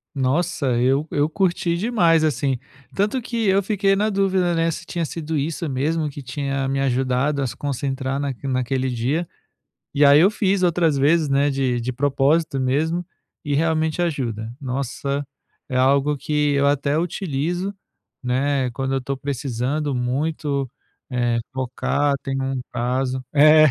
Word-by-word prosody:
Nossa, 140 Hz, +4 st, 0 dB
eu 135 Hz, +5 st, +2 dB
eu 145 Hz, +1 st, +2 dB
curti 175 Hz, -2 st, 0 dB
demais, 170 Hz, -6 st, +3 dB
assim. 135 Hz, -3 st, 0 dB, 0.4 s
Tanto 210 Hz, +6 st, +1 dB
que 230 Hz, -2 st, -2 dB
eu 195 Hz, +1 st, +3 dB
fiquei 195 Hz, 0 st, +2 dB
na 210 Hz, +2 st, +1 dB
dúvida, 190 Hz, -3 st, +1 dB
né, 165 Hz, 0 st, +2 dB
se 160 Hz, -, -6 dB
tinha 170 Hz, -2 st, -3 dB
sido 160 Hz, -1 st, -3 dB
isso 160 Hz, +3 st, -2 dB
mesmo 150 Hz, +4 st, 0 dB
que 145 Hz, -, -8 dB
tinha 140 Hz, +1 st, -3 dB
me 135 Hz, 0 st, -1 dB
ajudado 130 Hz, +2 st, +1 dB
a 135 Hz, -, 0 dB
se 120 Hz, +2 st, -6 dB
concentrar 135 Hz, -1 st, -2 dB
naquele 140 Hz, -1 st, -3 dB
naquele 130 Hz, +1 st, 0 dB
dia. 135 Hz, +8 st, -1 dB, 0.6 s
E 145 Hz, -, +3 dB
aí, 140 Hz, +1 st, +7 dB
eu 190 Hz, +4 st, +6 dB
fiz 200 Hz, -2 st, +1 dB
outras 170 Hz, -4 st, +2 dB
vezes, 150 Hz, +3 st, +3 dB
né, 140 Hz, +1 st, +2 dB
de 130 Hz, -3 st, 0 dB
de 125 Hz, +2 st, -3 dB
propósito 140 Hz, +2 st, +1 dB
mesmo, 160 Hz, +7 st, 0 dB, 0.4 s
e 145 Hz, -, -1 dB
realmente 160 Hz, +1 st, +1 dB
ajuda. 120 Hz, -9 st, -2 dB
Nossa, 140 Hz, +2 st, -3 dB, 0.4 s
é 130 Hz, -, -2 dB
algo 140 Hz, +3 st, +3 dB
que 150 Hz, +1 st, 0 dB
eu 140 Hz, 0 st, +3 dB
até 145 Hz, +1 st, +1 dB
utilizo, 175 Hz, +2 st, -2 dB, 0.5 s
né, 130 Hz, +1 st, 0 dB
quando 135 Hz, +2 st, -2 dB
eu -, -, +2 dB
estou 135 Hz, +1 st, -3 dB
precisando 140 Hz, +2 st, -2 dB
muito, 140 Hz, +2 st, -1 dB, 0.4 s
eh, 120 Hz, -2 st, +1 dB
focar, 135 Hz, +2 st, 0 dB
tenho 135 Hz, 0 st, -2 dB
um 135 Hz, -1 st, -2 dB
prazo 125 Hz, +2 st, -1 dB
é 155 Hz, +1 st, +7 dB
140 Hz, 155 wpm, -22 LUFS, 130-165 Hz, 0.6 s, aí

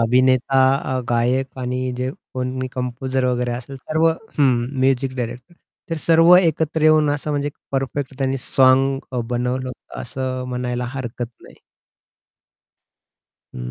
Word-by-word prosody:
अभिनेता 130 Hz, +3 st, +3 dB, 0.4 s
अ, -, -, 0 dB
गायक 125 Hz, +3 st, 0 dB
आणि 125 Hz, 0 st, -2 dB
जे 125 Hz, +1 st, -2 dB, 0.2 s
कोणी 130 Hz, 0 st, -2 dB
कंपोजर 130 Hz, +1 st, -2 dB
वगैरे 125 Hz, -1 st, 0 dB
असेल 125 Hz, +3 st, -6 dB
सर्व 155 Hz, +5 st, 0 dB
हं, 155 Hz, -, +1 dB, 0.3 s
म्युझिक 130 Hz, 0 st, +1 dB
डायरेक्टर. 125 Hz, +6 st, -5 dB, 0.4 s
ते 165 Hz, -, -1 dB
सर्व 165 Hz, +2 st, +6 dB
एकत्र 160 Hz, -3 st, +1 dB
येऊन 155 Hz, -1 st, +5 dB
असं 145 Hz, +1 st, -2 dB
म्हणजे 145 Hz, -1 st, -1 dB
एक 145 Hz, -, -5 dB, 0.2 s
परफेक्ट 135 Hz, 0 st, -2 dB
त्यांनी 135 Hz, -1 st, 0 dB
साँग 135 Hz, +1 st, +3 dB
अ, 125 Hz, -, -1 dB
बनवलं 125 Hz, +1 st, -1 dB
होतं, 125 Hz, -, -9 dB
असं 130 Hz, +1 st, -4 dB
म्हणायला 125 Hz, 0 st, -2 dB
हरकत 120 Hz, -2 st, -4 dB
नाही. -, -, -16 dB, 1.9 s
हं, -, -, -5 dB
130 Hz, 135 wpm, -21 LUFS, 125-140 Hz, 1.9 s, सर्व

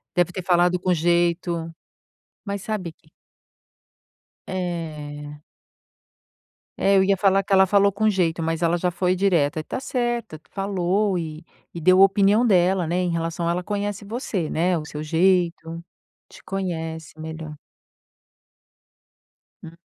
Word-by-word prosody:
Deve 180 Hz, 0 st, +2 dB
ter 185 Hz, 0 st, -6 dB
falado 175 Hz, 0 st, +3 dB
com 180 Hz, 0 st, +1 dB
jeito, 170 Hz, 0 st, 0 dB, 0.7 s
mas 200 Hz, -1 st, -4 dB
sabe 195 Hz, -6 st, -4 dB
que 155 Hz, -, -29 dB, 1.4 s
É. 150 Hz, -5 st, -5 dB, 1.4 s
Eu 195 Hz, -1 st, +4 dB
ia 195 Hz, 0 st, +2 dB
falar 195 Hz, 0 st, +3 dB
que 195 Hz, -, -12 dB
ela 190 Hz, 0 st, +6 dB
falou 200 Hz, +1 st, +3 dB
com 215 Hz, +3 st, 0 dB
jeito, 175 Hz, -5 st, +1 dB
mas 165 Hz, +1 st, -2 dB
ela 170 Hz, +1 st, +2 dB
já 180 Hz, +1 st, 0 dB
foi 180 Hz, +1 st, 0 dB
direta 170 Hz, -5 st, +1 dB
e -, -, -4 dB
tá -, -, -5 dB
certa, 240 Hz, -, -2 dB
tu 155 Hz, -, -29 dB
falou, 195 Hz, 0 st, 0 dB
e 160 Hz, -1 st, -6 dB, 0.3 s
e 170 Hz, -, -7 dB
deu 185 Hz, +3 st, +5 dB
opinião 200 Hz, +4 st, +4 dB
dela, 185 Hz, -3 st, +3 dB
né, 175 Hz, +3 st, -1 dB
em 180 Hz, -1 st, 0 dB
relação 170 Hz, 0 st, -2 dB
ela 180 Hz, +1 st, -1 dB
conhece 205 Hz, 0 st, -3 dB
você, 205 Hz, -7 st, -3 dB
né, 175 Hz, +2 st, +1 dB
o 150 Hz, -, -5 dB
seu 150 Hz, 0 st, -7 dB
jeito. 170 Hz, 0 st, +1 dB, 0.5 s
Te -, -, -16 dB
conhece 165 Hz, -5 st, -5 dB
melhor 160 Hz, -1 st, -7 dB, 2.1 s
Hum. 165 Hz, 0 st, -11 dB
175 Hz, 140 wpm, -23 LUFS, 165-195 Hz, 2.1 s, ela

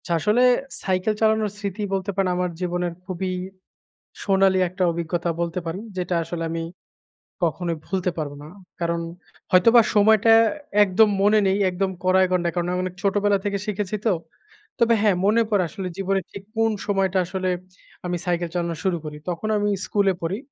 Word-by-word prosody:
আচ্ছা, 175 Hz, -, -1 dB
আসলে 215 Hz, +7 st, +3 dB, 0.4 s
সাইকেল 185 Hz, +3 st, 0 dB
চালানোর 220 Hz, -1 st, +2 dB
স্মৃতি 205 Hz, 0 st, -4 dB
বলতে 195 Hz, +1 st, -2 dB
পারেন 195 Hz, -1 st, +1 dB
আমার 180 Hz, -1 st, -1 dB
জীবনের 175 Hz, -1 st, -1 dB
খুবই 185 Hz, 0 st, -3 dB, 0.9 s
সোনালি 195 Hz, -1 st, +3 dB
একটা 185 Hz, +2 st, -4 dB
অভিজ্ঞতা 170 Hz, +1 st, -2 dB
বলতে 170 Hz, +1 st, -2 dB
পারি, 165 Hz, +4 st, -4 dB, 0.2 s
যেটা 180 Hz, -1 st, -2 dB
আসলে 165 Hz, +1 st, -5 dB
আমি 165 Hz, 0 st, -3 dB, 0.8 s
কখনোই 170 Hz, 0 st, 0 dB
ভুলতে 185 Hz, -2 st, -1 dB
পারবো 145 Hz, -2 st, -3 dB
না। -, -, -10 dB, 0.3 s
কারণ 170 Hz, 0 st, 0 dB, 0.5 s
হয়তোবা 230 Hz, +6 st, +6 dB
সময়টা 220 Hz, +1 st, +5 dB, 0.5 s
একদম 205 Hz, +3 st, +4 dB
মনে 210 Hz, +2 st, +5 dB
নেই 190 Hz, +1 st, +2 dB
একদম 190 Hz, +1 st, -1 dB
কড়ায় 185 Hz, 0 st, +4 dB
গণ্ডায় 175 Hz, -2 st, +1 dB
কারণ 175 Hz, 0 st, -1 dB
আমি 180 Hz, -, -1 dB
অনেক 185 Hz, -1 st, -5 dB
ছোটোবেলা 200 Hz, 0 st, +2 dB
থেকে 200 Hz, -1 st, -1 dB
শিখেছি 210 Hz, -1 st, -2 dB
তো। 220 Hz, -, +4 dB, 0.7 s
তবে 235 Hz, 0 st, +4 dB
হ্যা 210 Hz, -1 st, +4 dB
মনে 220 Hz, +3 st, +4 dB
পড়ে 205 Hz, -4 st, +2 dB
আসলে 195 Hz, -1 st, -5 dB
জীবনে 195 Hz, 0 st, 0 dB
ঠিক 200 Hz, -, -9 dB
কোন 225 Hz, 0 st, +2 dB, 0.2 s
সময়টা 195 Hz, -2 st, +1 dB
আসলে 185 Hz, +1 st, -2 dB, 0.6 s
আমি 175 Hz, 0 st, -1 dB
সাইকেল 175 Hz, -1 st, -1 dB
চালানো 170 Hz, -1 st, -1 dB
শুরু 185 Hz, -3 st, +1 dB
করি। 150 Hz, -1 st, -6 dB
তখন 175 Hz, +5 st, -3 dB
আমি 205 Hz, 0 st, +1 dB, 0.2 s
স্কুলে 200 Hz, -2 st, +2 dB
পড়ি 170 Hz, +4 st, -2 dB
190 Hz, 165 wpm, -23 LUFS, 175-205 Hz, 0.9 s, হয়তোবা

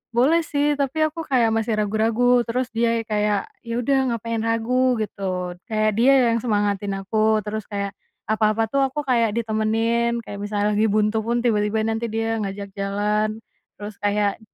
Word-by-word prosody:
"Boleh 315 Hz, +7 st, +4 dB
sih 290 Hz, 0 st, +1 dB
tapi 280 Hz, +2 st, -1 dB
aku 325 Hz, +1 st, -4 dB
kayak 240 Hz, -4 st, +3 dB
masih 225 Hz, -1 st, 0 dB
ragu-ragu," 225 Hz, +4 st, +2 dB
terus 250 Hz, +2 st, -1 dB
dia 230 Hz, 0 st, +2 dB
kayak, 210 Hz, -2 st, 0 dB, 0.2 s
"ya 230 Hz, -, -3 dB
udah 265 Hz, 0 st, +1 dB
ngapain 230 Hz, 0 st, -3 dB
ragu?" 245 Hz, +3 st, +1 dB
Gitu 185 Hz, -4 st, -3 dB
kayak 215 Hz, -1 st, +1 dB
dia 265 Hz, +3 st, +6 dB, 0.2 s
yang 230 Hz, -, 0 dB
semangatin 205 Hz, -3 st, 0 dB
aku 220 Hz, 0 st, +2 dB
terus 215 Hz, +1 st, -3 dB
kayak, 200 Hz, -1 st, -4 dB, 0.3 s
apa-apa 215 Hz, 0 st, +2 dB
tuh 275 Hz, +4 st, +1 dB
aku 280 Hz, +2 st, -4 dB
kayak 230 Hz, -4 st, +2 dB
ditemenin 230 Hz, +1 st, 0 dB
kayak 200 Hz, -1 st, -8 dB
misalnya 205 Hz, 0 st, 0 dB
lagi 220 Hz, +1 st, +3 dB
buntu 215 Hz, +1 st, +1 dB
pun 235 Hz, +2 st, -1 dB
tiba-tiba 215 Hz, -1 st, +1 dB
nanti 225 Hz, +1 st, -2 dB
dia 225 Hz, +1 st, -1 dB
ngajak 200 Hz, -1 st, -5 dB
jalan, 210 Hz, +2 st, -1 dB, 0.4 s
terus 205 Hz, 0 st, -8 dB
kayak. 205 Hz, 0 st, 0 dB
220 Hz, 160 wpm, -22 LUFS, 210-235 Hz, 0.4 s, dia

